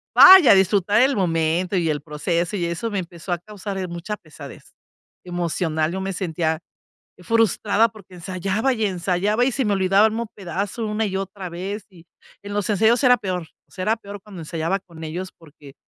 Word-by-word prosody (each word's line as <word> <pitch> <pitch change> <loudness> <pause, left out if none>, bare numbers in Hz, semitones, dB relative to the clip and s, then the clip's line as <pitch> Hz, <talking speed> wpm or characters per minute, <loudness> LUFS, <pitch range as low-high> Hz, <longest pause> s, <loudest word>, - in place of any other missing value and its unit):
vaya 370 - +10
disfrutar 195 +3 +3
el 270 +2 +3
momento 175 0 0
y 170 -2 +1
el 150 -2 -1
proceso 170 +5 -2
y 175 - -1
eso 170 +7 -3
me 200 - -1
empezó 175 0 -8
a 175 - -1
causar, 205 0 -7
eh, 185 -1 -3
mucha 175 +5 -5
pesadez 155 -3 -13 0.5
emocional. 170 -2 -1
Yo 190 - -3
me 195 0 -3
sentía 160 -3 -2 0.6
frustrada 225 +2 +2
porque 200 -4 -16
ensayaba 195 +7 -1
y 220 -2 0
ensayaba 190 +5 0
y 260 - +1
se 265 - -1
me 205 -2 +1
olvidaba 195 +3 +4
el 220 - 0
mismo 230 +1 -3
pedazo 200 +4 -4
una 210 +1 -1
y 190 -1 -3
otra 195 -1 -5
vez 190 +4 -5
y 175 -3 -18 0.4
en 205 0 -7
los 205 0 -1
ensayos 225 +5 +3
era 250 0 +6
peor. 180 -4 -3 0.2
Será 205 +4 -1
peor 205 -2 -10
cuando 200 -5 -11
ensayaba 165 +4 -2
con 165 -3 -12
ellos 180 +4 -5
porque 150 -3 -16
190 Hz, 185 wpm, -22 LUFS, 170-210 Hz, 0.6 s, vaya